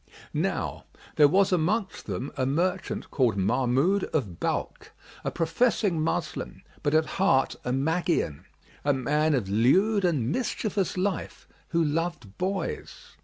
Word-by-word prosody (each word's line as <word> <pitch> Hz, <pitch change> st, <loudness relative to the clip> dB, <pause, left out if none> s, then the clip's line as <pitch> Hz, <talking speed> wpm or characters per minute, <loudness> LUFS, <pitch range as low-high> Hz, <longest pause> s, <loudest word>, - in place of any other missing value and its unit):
Now -, -, -2 dB, 0.3 s
there 150 Hz, -, +7 dB
was 195 Hz, +5 st, +3 dB
amongst 190 Hz, +4 st, 0 dB
them 105 Hz, +7 st, -3 dB
a 130 Hz, -, -1 dB
merchant 175 Hz, +8 st, -1 dB
called 120 Hz, -7 st, +2 dB
Mahmъd 135 Hz, -, +2 dB
of 100 Hz, -, -2 dB
Balkh, -, -, -3 dB, 0.3 s
a -, -, 0 dB
professing 170 Hz, +1 st, +1 dB
Moslem 155 Hz, -, -3 dB, 0.2 s
but 145 Hz, +1 st, +1 dB
at 160 Hz, 0 st, +4 dB
heart 155 Hz, -7 st, +2 dB
a 125 Hz, -, -2 dB
Magian, 155 Hz, -, 0 dB, 0.4 s
a 145 Hz, -, +3 dB
man 150 Hz, +4 st, +1 dB
of 115 Hz, -7 st, -1 dB
lewd 185 Hz, -, +3 dB
and 145 Hz, -9 st, +1 dB
mischievous 205 Hz, -5 st, -1 dB
life 185 Hz, -1 st, -2 dB, 0.2 s
who 170 Hz, -1 st, +1 dB
loved 150 Hz, -, -2 dB
boys. 190 Hz, -1 st, -4 dB
160 Hz, 130 wpm, -27 LUFS, 130-185 Hz, 0.4 s, there